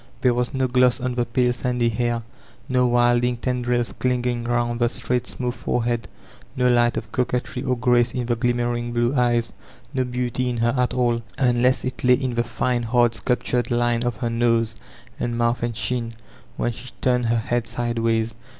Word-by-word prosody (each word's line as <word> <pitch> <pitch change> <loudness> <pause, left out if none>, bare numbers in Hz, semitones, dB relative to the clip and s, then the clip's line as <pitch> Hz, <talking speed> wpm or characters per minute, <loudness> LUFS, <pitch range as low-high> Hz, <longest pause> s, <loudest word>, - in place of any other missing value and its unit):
There 125 -2 +4
was 120 0 -1
no 130 -2 0
gloss 125 0 +3
on 130 0 -2
the 120 0 0
pale 125 +1 +2
sandy 125 -1 0
hair, 120 +1 -1 0.4
no 125 -1 +2
wilding 120 0 +3
tendrils 125 -1 -1
clinging 125 -1 -1
round 120 0 0
the 120 -1 +3
straight 125 0 -2
smooth 125 -1 -2
forehead, 120 -1 -1 0.5
no 125 0 +2
light 120 0 +3
of 110 - -5
coquetry 125 0 -1
or 125 0 0
grace 120 0 +3
in 125 -1 -3
the 120 0 0
glimmering 120 0 -1
blue 120 +2 +1
eyes, 120 -3 +1 0.4
no 130 -2 +1
beauty 125 0 -2
in 120 - -2
her 115 +1 +1
at 125 -1 0
all, 120 -2 +1 0.2
un 120 -2 +2
less 125 +1 +2
it 130 - -4
lay 125 0 +6
in 130 -1 -2
the 120 0 +1
fine, 120 +1 -1
hard 120 0 +2
sculptured 125 +2 -1
line 120 -1 +1
of 120 -2 -1
her 115 +2 -2
nose 115 -1 +1 0.4
and 120 -1 -2
mouth 120 0 +1
and 120 -1 -2
chin 115 +1 -2 0.4
when 120 - 0
she 125 +2 -9
turned 125 -2 +2
her 115 +1 +2
head 115 +1 -1
sideways. 115 -1 0
120 Hz, 185 wpm, -23 LUFS, 120-125 Hz, 0.5 s, lay